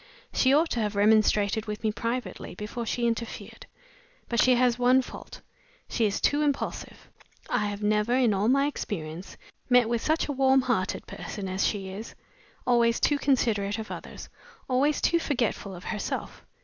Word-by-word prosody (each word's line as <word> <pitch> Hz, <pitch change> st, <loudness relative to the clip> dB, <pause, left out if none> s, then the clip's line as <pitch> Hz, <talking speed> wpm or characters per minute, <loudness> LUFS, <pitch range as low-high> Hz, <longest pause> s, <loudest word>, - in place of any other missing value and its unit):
She 260 Hz, -, +3 dB
ought 315 Hz, +4 st, +3 dB
to 240 Hz, -, -1 dB
have 210 Hz, -2 st, -1 dB
remonstrated 210 Hz, 0 st, +3 dB
with 210 Hz, +1 st, -5 dB
me 215 Hz, -, +2 dB
privately 230 Hz, -5 st, -4 dB
before 215 Hz, +4 st, -5 dB
she 240 Hz, +1 st, -1 dB
interfered. 230 Hz, 0 st, -4 dB, 0.6 s
But 235 Hz, -2 st, +2 dB
she 255 Hz, -1 st, +5 dB
has 245 Hz, 0 st, +2 dB
one 250 Hz, +1 st, +4 dB
fault -, -, -10 dB, 0.5 s
she 225 Hz, -, +1 dB
is 200 Hz, -, -2 dB
too 290 Hz, +1 st, +2 dB
impulsive. 290 Hz, -2 st, -3 dB, 0.4 s
I 210 Hz, -, +1 dB
have 205 Hz, 0 st, -5 dB
never, 210 Hz, +3 st, +2 dB
in 250 Hz, -5 st, +3 dB
all 200 Hz, +2 st, +1 dB
my 275 Hz, +3 st, +4 dB
experience, 175 Hz, -, -5 dB, 0.3 s
met 250 Hz, -2 st, +5 dB
with 235 Hz, 0 st, -1 dB
such 315 Hz, +1 st, +1 dB
a -, -, -2 dB
warm 265 Hz, 0 st, +4 dB
hearted 220 Hz, -8 st, -1 dB
person 200 Hz, -2 st, -6 dB
as 190 Hz, +1 st, 0 dB
she 195 Hz, -3 st, -3 dB
is. 205 Hz, +4 st, -8 dB, 0.5 s
Always 235 Hz, -1 st, +3 dB
too 290 Hz, -1 st, +2 dB
considerate 220 Hz, -8 st, +1 dB
of 220 Hz, -1 st, -6 dB
others; -, -, -8 dB, 0.4 s
always 275 Hz, +4 st, +1 dB
too 340 Hz, -, +3 dB
forgetful 235 Hz, -, -2 dB
of 175 Hz, -, -11 dB
herself! 210 Hz, -, -5 dB
230 Hz, 170 wpm, -27 LUFS, 210-255 Hz, 0.6 s, she